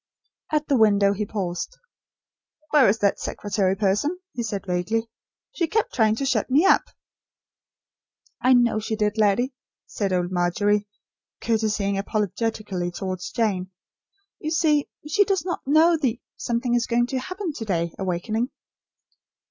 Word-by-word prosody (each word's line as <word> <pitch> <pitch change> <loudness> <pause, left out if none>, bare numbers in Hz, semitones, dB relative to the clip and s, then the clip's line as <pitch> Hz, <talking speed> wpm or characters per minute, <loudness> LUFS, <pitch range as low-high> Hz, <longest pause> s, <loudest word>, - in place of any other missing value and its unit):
At 305 -1 0
the 275 - +3
window 200 -2 +4
he 205 +1 -3
paused. 190 - -4 0.9
"Where 290 -8 +6
is 210 - +2
that 200 -1 +2
secretary 195 -2 -1
person?" 210 - +1 0.2
he 240 - -3
said, 205 -4 -4
vaguely. 185 +5 -1 0.4
"She 345 -9 -1
kept 435 +6 0
trying 220 -2 +3
to 275 - -2
shut 270 - 0
me 290 +8 +4
up." 385 - +6 1.6
"I 255 +1 +5
know 240 -3 +3
she 220 +1 -3
did, 210 0 0
laddie," 220 +6 +2 0.3
said 200 -3 -2
old 180 -1 0
Margery, 205 +4 +1 0.5
curtseying 215 -3 0
apologetically 210 -2 -2
towards 180 0 -5
Jane. 190 -5 -1 0.7
"You 310 - -3
see 305 -2 +2 0.2
she 315 +7 +4
does 385 -2 -1
not 350 -6 -4
know 320 +4 +5
the 255 -6 -1 0.2
'something 240 0 -1
is 240 -1 +1
going 240 0 +2
to 260 +1 -2
happen 370 +4 -4
to 230 - -6
day' 170 -4 -1
awakening." 195 +6 -1
220 Hz, 145 wpm, -24 LUFS, 195-265 Hz, 1.6 s, Where